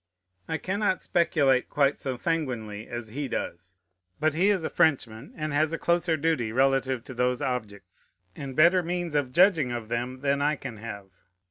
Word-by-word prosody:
I 160 - -1
cannot 200 +1 -1
speculate 140 -7 +2
quite 140 -1 +2
so 130 -2 -3
sanguinely 120 -9 -3
as 120 -2 -6
he 140 +5 -4
does: 90 -5 -5 0.4
but 155 0 +2
he 180 +6 +3
is 195 -5 +1
a - - -1
Frenchman, 125 -5 +1
and 155 -2 -3
has 155 +2 +2
a - - 0
closer 170 -1 +1
duty 145 -7 0
relative 135 0 +1
to 130 - -9
those 125 0 0
objects, 105 -7 -5 0.2
and 135 -2 -7
better 170 +5 +5
means 175 -1 -3
of 145 -4 0
judging 165 -5 +4
of 120 -2 -5
them, 125 +2 -3
than 140 0 +1
I 150 +1 +2
can 135 -5 -8
have. 100 -3 -8
135 Hz, 175 wpm, -27 LUFS, 120-160 Hz, 0.4 s, better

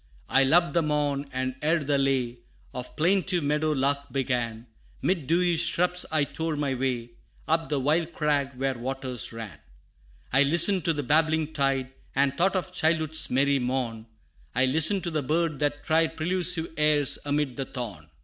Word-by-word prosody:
I 135 - +4
loved 170 +6 +3
the 170 - +3
morn, 145 -2 -1
and 130 0 -2
ere 160 +1 +1
the 140 0 +1
lay 130 -3 0 0.3
Of 125 0 -7
plaintive 180 +1 +1
meadow 150 +2 +1
lark 140 +1 -1
began, 120 -4 -2 0.4
'Mid 170 -7 0
dewy 175 +1 +2
shrubs 175 +2 +1
I 155 -2 +2
tore 160 +2 -3
my 145 -2 -1
way, 125 -2 -2 0.4
Up 165 +1 0
the 145 -2 0
wild 160 +5 +1
crag 145 -4 0
where 135 +1 -1
waters 130 0 -5
ran. 110 -9 -8 0.7
I 135 - +5
listened 170 +5 +4
to 165 - +3
the 145 -1 -3
babbling 160 +2 +1
tide, 135 -2 0 0.2
And 140 0 +2
thought 190 +5 +1
of 185 0 -2
childhood's 160 -2 +1
merry 140 +2 +2
morn, 125 -3 -3 0.5
I 130 +2 +3
listened 160 +8 +2
to 170 - -2
the 155 -2 -1
bird 155 +1 -1
that 145 0 -1
tried 160 +1 +1
Prelusive 175 0 +1
airs, 150 -2 +2
amid 145 -3 -1
the 135 - -3
thorn. 105 - -7
145 Hz, 170 wpm, -26 LUFS, 130-160 Hz, 0.7 s, I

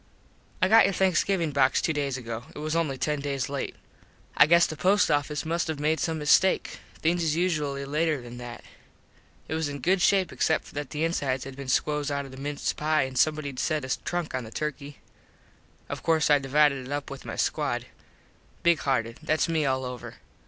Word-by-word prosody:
I - - +6
got 225 0 +7
your 195 - 0
Thanksgivin 185 -3 +1
box 135 -1 +3
two 160 - 0
days 140 -3 -1
ago. 115 -1 -6
It - - -9
was 155 +2 -2
only 155 -5 0
ten 150 +2 -1
days 140 -1 -2
late. 140 -1 -4 0.6
I - - +7
guess 170 +1 +6
the 155 - -5
post 195 +6 +3
office 145 +1 0
must 170 +2 -1
have 160 -2 -3
made 155 +1 +1
some 160 +1 -1
mistake. 155 +5 +3 0.2
Things 170 +2 +2
is 155 -2 +1
usually 150 -6 -1
later 155 +1 0
than 120 0 -10
that. 120 -1 -8 0.8
It - - -4
was 160 -2 -1
in 145 - -5
good 180 +8 +1
shape 190 0 +3
except 160 - 0
that 145 -1 -4
the 155 +1 -3
insides 140 -6 -1
had 135 -1 -8
been 140 0 -8
squoze 150 +2 +1
out 140 -1 -2
of 135 - -11
the 130 - -11
mince 145 +2 -2
pie 155 -1 +1
and 130 0 -5
somebodied 145 -1 +1
set 155 -4 0
a 130 - -2
trunk 175 -2 -3
on 130 -1 -2
the 110 - -9
turky. 145 +2 -5 0.9
Of - - -5
course 160 -2 +2
I 145 - +6
divided 140 -1 +2
it - - -8
up 145 -1 -3
with 140 - -8
my - - -6
squad. - - -1 0.8
Big 170 -2 +4
hearted. 115 -5 -1
Thats 155 0 +1
me 160 -3 +1
all 130 0 0
over. 125 -1 -7
150 Hz, 205 wpm, -27 LUFS, 135-160 Hz, 0.9 s, got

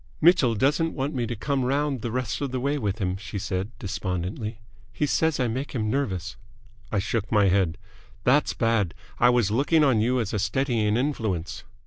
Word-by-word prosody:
"Mitchell 150 -8 +5
doesn't 150 +8 +1
want 140 +3 -2
me 120 -4 -1
to 120 - -3
come 140 +4 -1
round 140 0 0
the 120 - -3
rest 125 0 -2
of 140 - -1
the 130 - -2
way 140 +3 0
with 105 -3 -1
him," 95 -3 -1
she 105 +1 -6
said, 95 +1 -2
despondently. 95 +2 -4 0.3
"He 120 +5 0
says 160 +1 +1
I 125 - +2
make 130 +5 -3
him 110 -4 -1
nervous." 95 -9 -2 0.5
I 105 - 0
shook 100 +1 -1
my 105 -3 +4
head. 90 -2 +2 0.5
"That's 140 +5 +3
bad! 115 -7 +1 0.2
I 120 - +6
was 120 -5 +2
looking 145 +7 +3
on 130 -7 +4
you 125 +3 +2
as 110 -4 -2
a 105 - 0
steadying 115 -1 +1
influence." 110 - -2
115 Hz, 190 wpm, -25 LUFS, 100-135 Hz, 0.5 s, I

